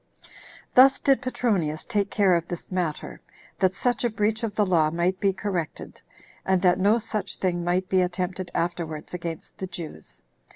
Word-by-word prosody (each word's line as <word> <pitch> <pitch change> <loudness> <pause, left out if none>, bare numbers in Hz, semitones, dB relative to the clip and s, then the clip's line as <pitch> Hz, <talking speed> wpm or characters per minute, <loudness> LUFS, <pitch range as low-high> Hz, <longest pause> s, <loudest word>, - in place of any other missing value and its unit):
4. - - -20 0.4
Thus 265 +2 +7
did 275 -1 +3
Petronius 200 -12 -1
take 205 -3 0
care 195 -4 +3
of 170 0 -1
this 175 +1 -7
matter, 175 -5 -3 0.4
that 185 -1 +2
such 245 +2 0
a 240 - +2
breach 220 +1 0
of 225 -3 -3
the 210 - +3
law 165 -5 +3
might 175 +3 0
be 200 -2 +3
corrected, 185 -5 -4 0.4
and 190 -1 +2
that 180 0 +4
no 205 +4 +4
such 215 -2 -4
thing 175 -2 -1
might 180 +2 0
be 185 0 +3
attempted 180 0 -2
afterwards 165 -3 -3
against 170 -2 -6
the 190 - -3
Jews. 165 - -9
185 Hz, 175 wpm, -25 LUFS, 175-210 Hz, 0.4 s, Thus